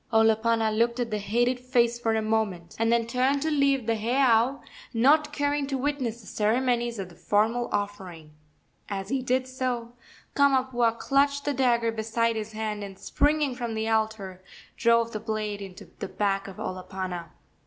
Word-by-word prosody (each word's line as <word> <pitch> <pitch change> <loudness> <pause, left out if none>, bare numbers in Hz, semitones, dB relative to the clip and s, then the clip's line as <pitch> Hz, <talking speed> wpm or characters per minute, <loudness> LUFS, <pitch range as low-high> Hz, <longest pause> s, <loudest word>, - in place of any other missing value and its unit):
Olopana 225 0 +3
looked 235 +2 +1
at 235 -2 -2
the 210 - -1
hated 240 +5 +1
face 240 -2 +1
for 225 -2 0
a 220 - 0
moment, 215 -6 -1
and 225 0 +2
then 235 -1 +2
turned 255 +4 +1
to 315 - 0
leave 280 -4 +2
the 230 - +1
heiau, 240 +3 +2 0.4
not 295 +6 +4
caring 290 -1 0
to 275 -1 -2
witness 260 -4 -2
the - - -17
ceremonies 235 +2 0
of 190 -2 -5
the 175 - -16
formal 215 +7 +1
offering. 190 -6 -4 0.6
As 195 -1 -4
he 270 +1 0
did 255 +1 0
so 250 -2 -3 0.4
Kamapuaa 260 -4 +2
clutched 280 +2 +1
the 290 - +1
dagger 240 -3 +2
beside 225 +1 0
his 220 0 -5
hand, 215 -1 -3
and, 195 -1 -8
springing 295 +2 +1
from 240 -2 -4
the 220 0 -1
altar, 215 -4 -1 0.3
drove 230 0 +3
the 215 - -4
blade 215 -2 -3
into 190 -2 -10
the - - -3
back 195 -1 -1
of 195 - -10
Olopana. 185 -2 -5
230 Hz, 170 wpm, -27 LUFS, 215-255 Hz, 0.6 s, not